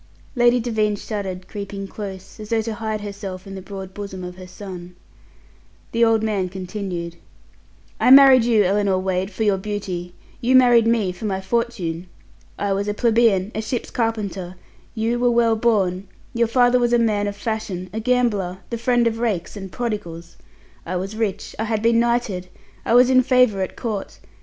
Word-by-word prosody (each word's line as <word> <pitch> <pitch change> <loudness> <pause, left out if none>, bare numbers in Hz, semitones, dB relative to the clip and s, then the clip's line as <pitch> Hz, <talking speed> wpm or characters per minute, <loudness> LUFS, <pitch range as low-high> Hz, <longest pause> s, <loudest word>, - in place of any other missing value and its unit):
Lady 240 0 +4
Devine 220 -3 0
shuddered, 190 -3 -5
creeping 200 -1 -6
close, 195 0 -8
as 210 -1 -8
though 225 -1 +1
to 225 0 -3
hide 215 -1 -3
herself 200 -2 -7
in 195 - -9
the 190 - -7
broad 190 -1 -8
bosom 195 -2 -7
of 180 0 -7
her 185 0 -11
son. 180 -1 -9 1.0
The 230 0 +2
old 225 -1 +3
man 200 -4 -1
continued: 180 -2 -5 0.8
"I - - +3
married 265 -2 +9
you, 225 -3 +4
Ellinor 195 0 +2
Wade, 185 0 -1
for 210 +2 -3
your 200 -3 +2
beauty; 190 -3 -5 0.3
you 255 +2 +3
married 240 -3 +6
me 225 -5 +2
for 180 +4 -8
my 190 -2 -1
fortune. 190 -5 -2 0.5
I 200 -1 0
was 200 +1 -2
a 205 - -1
plebeian, 225 -4 +2
a 220 - -2
ship's 235 +2 -4
carpenter; 200 -6 -2 0.4
you 230 +2 0
were 245 0 +3
well 235 -1 +3
born, 200 -5 +1 0.3
your 235 0 +2
father 245 +1 +4
was 240 0 +1
a - - +6
man 210 -3 +1
of 200 - -4
fashion, 205 -4 -4
a 220 - -2
gambler, 220 -7 0
the 235 - -3
friend 240 0 +2
of 225 -1 0
rakes 215 -8 -2
and 195 -2 -7
prodigals. 175 -8 -5 0.5
I 180 - -4
was 195 +4 -4
rich. 210 -2 -3
I 220 - 0
had 220 -1 -1
been 230 0 +4
knighted. 235 -6 0 0.4
I 230 - +2
was 250 +1 +6
in 255 0 +6
favour 250 -6 +3
at 185 - -3
Court. 215 -4 -4
210 Hz, 180 wpm, -21 LUFS, 190-235 Hz, 1.0 s, married